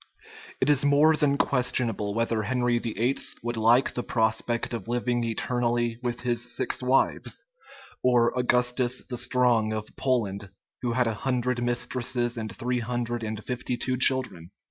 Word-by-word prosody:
It 130 Hz, -, +1 dB
is 145 Hz, -1 st, +3 dB
more 145 Hz, +2 st, +5 dB
than 145 Hz, -2 st, +2 dB
questionable 120 Hz, -7 st, 0 dB
whether 115 Hz, -1 st, 0 dB
Henry 120 Hz, +2 st, 0 dB
VIII. 115 Hz, +3 st, -1 dB, 0.2 s
would 120 Hz, 0 st, -3 dB
like 115 Hz, +4 st, +3 dB
the 125 Hz, -, -2 dB
prospect 115 Hz, +1 st, -1 dB
of 115 Hz, -3 st, -5 dB
living 120 Hz, 0 st, -1 dB
eternally 120 Hz, 0 st, -1 dB
with 120 Hz, -1 st, -3 dB
his 120 Hz, -1 st, 0 dB
six -, -, 0 dB
wives; 130 Hz, +1 st, 0 dB, 0.6 s
or 120 Hz, -2 st, +3 dB
Augustus 125 Hz, 0 st, +1 dB
the 125 Hz, -, -5 dB
Strong 120 Hz, -3 st, +2 dB
of 110 Hz, 0 st, -6 dB
Poland, 105 Hz, -7 st, -1 dB, 0.3 s
who 120 Hz, -2 st, -1 dB
had 125 Hz, +1 st, +2 dB
a 115 Hz, -, 0 dB
hundred 125 Hz, +1 st, -1 dB
mistresses 120 Hz, 0 st, 0 dB
and 110 Hz, -2 st, -5 dB
three 125 Hz, +1 st, -1 dB
hundred 120 Hz, 0 st, -3 dB
and 110 Hz, -1 st, -5 dB
fifty 125 Hz, 0 st, -3 dB
two 130 Hz, +1 st, -1 dB
children. 130 Hz, -10 st, +2 dB
120 Hz, 150 wpm, -26 LUFS, 115-125 Hz, 0.6 s, more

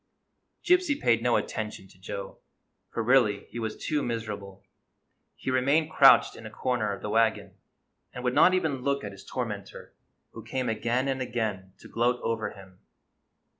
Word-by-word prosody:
Gypsy 360 Hz, -5 st, +3 dB
paid 115 Hz, -1 st, +3 dB
no 120 Hz, 0 st, +2 dB
attention 105 Hz, -3 st, -3 dB
to 95 Hz, -, -21 dB
Joe, 95 Hz, +1 st, -7 dB, 0.5 s
for 115 Hz, -, -3 dB
really 110 Hz, -5 st, +3 dB
he 120 Hz, -, -5 dB
was 110 Hz, -1 st, -4 dB
too 150 Hz, -1 st, -1 dB
miserable. 105 Hz, -5 st, -5 dB, 0.7 s
He 130 Hz, -, -4 dB
remained 140 Hz, +5 st, +2 dB
crouched 135 Hz, -3 st, +6 dB
in -, -, -11 dB
a -, -, -8 dB
corner 115 Hz, -2 st, -1 dB
of 100 Hz, -, -7 dB
the 105 Hz, -, -3 dB
wagon, 115 Hz, 0 st, +1 dB, 0.6 s
and 125 Hz, -, -8 dB
would 125 Hz, -1 st, 0 dB
not 185 Hz, -, +6 dB
even 155 Hz, -8 st, -1 dB
look 140 Hz, +1 st, -1 dB
at 105 Hz, -, -5 dB
his 100 Hz, -, -13 dB
tormentor, 105 Hz, -6 st, -6 dB, 0.4 s
who -, -, -9 dB
came 130 Hz, -2 st, -2 dB
again 120 Hz, +4 st, 0 dB
and 135 Hz, -1 st, -1 dB
again 110 Hz, -7 st, -3 dB
to -, -, -12 dB
gloat 120 Hz, +1 st, +1 dB
over 115 Hz, -1 st, -1 dB
him. 95 Hz, -2 st, -15 dB
115 Hz, 170 wpm, -27 LUFS, 105-130 Hz, 0.7 s, crouched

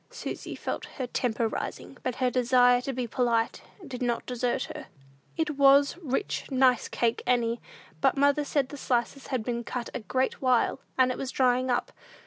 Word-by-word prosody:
Susy -, -, -6 dB
felt -, -, -4 dB
her 260 Hz, -, -2 dB
temper 235 Hz, -2 st, 0 dB
rising, -, -, -5 dB
but 255 Hz, -, -2 dB
her 255 Hz, -1 st, +1 dB
desire 245 Hz, 0 st, +4 dB
to 270 Hz, -, -3 dB
be 250 Hz, -1 st, -2 dB
polite 235 Hz, -1 st, 0 dB, 0.3 s
did 255 Hz, -2 st, -7 dB
not 240 Hz, -1 st, -1 dB
desert 245 Hz, -1 st, -1 dB
her. -, -, -8 dB, 0.5 s
"It 305 Hz, -3 st, -1 dB
was 280 Hz, 0 st, +6 dB
rich, 325 Hz, +3 st, -3 dB
nice 260 Hz, -2 st, +3 dB
cake, 235 Hz, -1 st, 0 dB
Annie; 235 Hz, -1 st, +1 dB, 0.4 s
but -, -, +3 dB
mother 285 Hz, +1 st, +3 dB
said 280 Hz, -2 st, 0 dB
the 290 Hz, -, -8 dB
slices 255 Hz, +1 st, -1 dB
had 255 Hz, -5 st, -2 dB
been 235 Hz, 0 st, -2 dB
cut 245 Hz, 0 st, -5 dB
a -, -, -3 dB
great 255 Hz, +5 st, -1 dB
while, 255 Hz, 0 st, +2 dB, 0.2 s
and 255 Hz, -1 st, +4 dB
it -, -, -5 dB
was 270 Hz, -, -3 dB
drying 255 Hz, 0 st, +2 dB
up. 245 Hz, -, 0 dB
255 Hz, 180 wpm, -28 LUFS, 240-270 Hz, 0.5 s, was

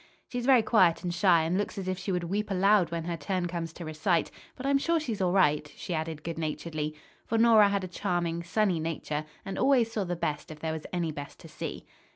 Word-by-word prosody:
"She's 245 Hz, 0 st, -3 dB
very 255 Hz, -4 st, +6 dB
quiet 185 Hz, -8 st, +4 dB
and 175 Hz, -1 st, -2 dB
shy 175 Hz, -2 st, +4 dB
and 175 Hz, +4 st, 0 dB
looks 205 Hz, -, -3 dB
as 190 Hz, -2 st, -4 dB
if 185 Hz, -, 0 dB
she 195 Hz, -, -3 dB
would 180 Hz, -1 st, 0 dB
weep 205 Hz, +5 st, -2 dB
aloud 195 Hz, -2 st, +4 dB
when 170 Hz, -1 st, -3 dB
her 170 Hz, +1 st, -3 dB
turn 175 Hz, +3 st, -2 dB
comes 170 Hz, -2 st, -4 dB
to 170 Hz, -, -8 dB
recite, 155 Hz, +2 st, 0 dB, 0.2 s
but 260 Hz, -, -7 dB
I'm 275 Hz, 0 st, +3 dB
sure 335 Hz, +3 st, +1 dB
she's 230 Hz, -9 st, -3 dB
all 180 Hz, -1 st, +2 dB
right," 150 Hz, -6 st, +2 dB
she 180 Hz, -, -5 dB
added 160 Hz, -1 st, -3 dB
good 165 Hz, -1 st, -4 dB
naturedly. 155 Hz, -1 st, -3 dB, 0.3 s
For 225 Hz, -, 0 dB
Nora 225 Hz, -3 st, +6 dB
had 200 Hz, -1 st, 0 dB
a -, -, -3 dB
charming, 175 Hz, -2 st, -1 dB
sunny 180 Hz, 0 st, +1 dB
nature, 155 Hz, -1 st, -3 dB, 0.2 s
and 195 Hz, -, -4 dB
always 250 Hz, -5 st, +3 dB
saw 215 Hz, -3 st, -1 dB
the 175 Hz, -1 st, -2 dB
best 150 Hz, -3 st, -3 dB
if 155 Hz, -1 st, -9 dB
there 160 Hz, 0 st, -2 dB
was 160 Hz, -1 st, -6 dB
any 175 Hz, -3 st, -1 dB
best 145 Hz, -1 st, -8 dB
to -, -, -11 dB
see. -, -, -6 dB
175 Hz, 235 wpm, -29 LUFS, 160-205 Hz, 0.3 s, very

